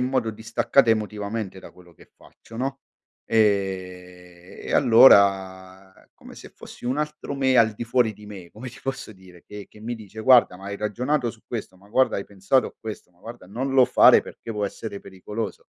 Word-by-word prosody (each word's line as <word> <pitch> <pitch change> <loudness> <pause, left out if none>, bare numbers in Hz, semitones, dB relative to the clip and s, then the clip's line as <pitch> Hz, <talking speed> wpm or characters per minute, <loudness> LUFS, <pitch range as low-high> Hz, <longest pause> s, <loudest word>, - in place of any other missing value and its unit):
modo 125 -2 -1
distaccata 115 +4 +1
emotivamente 105 -2 -2
da - - -13
quello 90 -1 -19
che - - -21
faccio, 115 - -16
no? 135 +2 -3 0.5
Ehm, 90 -4 -2
e - - -4
allora 95 -6 +4 0.2
come - - -15
se - - -12
fossi - - -14
un 130 +4 -1
altro 150 -1 -4
me 130 -2 +1
al 110 -2 +4
di 105 - -8
fuori 120 -2 +1
di 105 +1 -15
me, 95 -4 -10
come 125 +4 -9
ti 120 - -14
posso 135 -3 -5
dire, 95 -2 -18
che 105 -1 -10
che 105 - -18
mi 120 +3 -5
dice: 110 -1 -11
“Guarda, 120 -6 +5
ma 95 - -14
hai 100 0 -5
ragionato 120 +5 -1
su 110 - -18
questo? 110 -5 -6
Ma 100 +2 -21
guarda, 130 +5 +2
hai 100 - -4
pensato 100 +6 0
a - - -11
questo? 110 -4 -9
Ma 90 - -33
guarda, 115 -4 -11
non 125 +8 -4
lo 130 -2 +6
fare - - +6
perché - - -11
può 105 -1 -2
essere 100 0 -6
pericoloso”. 100 +3 -7
105 Hz, 195 wpm, -23 LUFS, 95-120 Hz, 0.5 s, lo